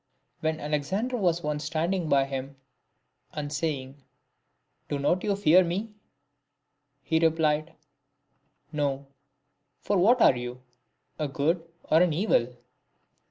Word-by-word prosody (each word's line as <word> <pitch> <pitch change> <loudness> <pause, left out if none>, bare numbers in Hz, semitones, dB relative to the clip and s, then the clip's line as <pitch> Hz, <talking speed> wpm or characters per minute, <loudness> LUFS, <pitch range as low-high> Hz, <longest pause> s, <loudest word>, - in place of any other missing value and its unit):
When 160 0 -1
Alexander 155 - -2
was 175 -6 +1
once 150 0 -2
standing 165 +3 -1
by 140 -1 +4
him,*and 135 +2 -9
saying, 140 -3 -3 0.4
" - - -47
Do 145 - -1
not 145 +6 +1
you 205 -1 +1
fear 185 -2 +5
me 195 +6 -3 0.6
?" 145 -1 -51
He 160 +3 +1
replied, 160 -1 +1 0.5
" 140 +2 -45
No; 140 -1 -1 0.7
for 205 -2 0
what 235 +8 +5
are 135 - +6
you, 125 +1 -6 0.6
a 150 - 0
good 165 +5 -1 0.2
or 160 +2 +6
an 180 -3 +3
evil 160 - +2
150 Hz, 125 wpm, -27 LUFS, 140-175 Hz, 0.7 s, are